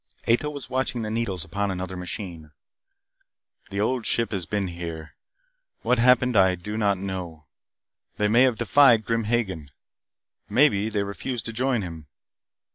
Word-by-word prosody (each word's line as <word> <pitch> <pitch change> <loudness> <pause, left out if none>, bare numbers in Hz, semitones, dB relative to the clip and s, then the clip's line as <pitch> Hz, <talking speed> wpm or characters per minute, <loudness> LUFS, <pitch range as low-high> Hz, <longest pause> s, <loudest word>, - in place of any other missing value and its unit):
Ato 120 +6 +2
was 145 -2 -7
watching 130 -2 -2
the 110 - -4
needles 105 -7 -2
upon 100 +4 -2
another 95 0 -4
machine. 90 -3 -7 1.2
"The 100 - -4
Old 120 +3 0
Ship 115 -1 +1
has 95 -5 -3
been 100 -3 -1
here. 85 -2 -7 0.7
What 125 -1 +2
happened 125 0 +4
I 95 -2 +5
do 105 +5 -6
not 100 -3 +1
know. 90 -5 -6 0.7
They 105 - +2
may 115 +4 +4
have 130 -3 +4
defied 120 -6 +5
Grim 115 0 0
Hagen. 95 -10 -1 0.8
Maybe 115 -6 +3
they 105 -2 -1
refused 110 +4 -4
to 115 - -3
join 125 -2 0
him. 80 -4 -8
105 Hz, 150 wpm, -25 LUFS, 90-120 Hz, 1.2 s, I